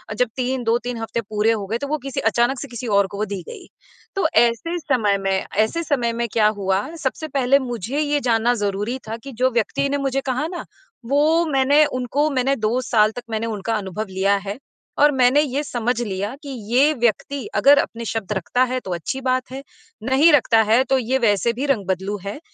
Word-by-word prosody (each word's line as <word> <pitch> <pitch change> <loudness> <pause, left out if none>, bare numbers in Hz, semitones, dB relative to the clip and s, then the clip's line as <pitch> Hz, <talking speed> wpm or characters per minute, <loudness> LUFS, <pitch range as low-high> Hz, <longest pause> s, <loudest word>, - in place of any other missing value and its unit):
जब 250 +1 +1
3, 255 0 -2
2-3 240 +1 -1
हफ़्ते 225 +1 -3
पूरे 215 +1 0
हो 210 -3 -2
गए, 225 +3 -1
तो 280 - -5
वो 305 - -1
किसी 270 - -3
अचानक 245 +2 +1
से 285 - -6
किसी 240 0 -7
और 200 -2 +3
को 200 +2 -4
दी 200 -2 -5
गई। - - -10 0.5
तो 380 -5 +2 0.2
ऐसे 240 +10 -1
समय 235 -10 +1
में 195 0 -2 0.3
ऐसे 220 +11 +1
समय 245 -7 0
में 235 0 -2
क्या 215 -2 +4
हुआ, 195 -2 0 0.2
सबसे 310 +4 -2
पहले 275 -1 +2
मुझे 245 +1 -4
ये 295 -1 +1
जानना 230 +1 +3
ज़रूरी 205 +5 -2
था 225 - -4
कि 275 - -8
जो 260 - +5
व्यक्ति 240 +4 0
ने 285 - 0
मुझे 275 -1 -1
कहा 280 +5 -1
ना, 350 0 -6 0.4
वो 305 +6 +3
मैंने 285 +1 +4
उनको 275 +3 -1
मैंने 270 +1 +1
2 225 +1 0
साल 215 -3 +3
तक 245 +2 -8
मैंने 220 0 -2
उनका 220 0 -2
अनुभव 200 +1 -4
लिया 190 +2 +1
है 205 +6 -4 0.4
और 295 - +6
मैंने 260 +1 +4
ये 285 -1 -1
समझ 240 -2 -2
लिया 205 +1 -3
कि, 285 - -8 0.2
"ये 280 +5 +5
व्यक्ति 240 +1 -1
अगर 285 +1 +6
अपने 235 -3 -3
शब्द 220 -2 -4
रखता 230 +7 0
है, 255 - 0
तो 190 - -8
अच्छी 260 - -4
बात 255 0 -1
है, 270 +1 -7 0.4
नहीं 270 +7 +4
रखता 235 -5 +4
है, 245 +4 +5
तो 265 +1 +1
ये 255 +1 0
वैसे 225 0 +2
भी 260 +5 -3
रंग-बदलू 195 -5 -1
है।" 205 +9 -5
245 Hz, 210 wpm, -21 LUFS, 215-275 Hz, 0.5 s, और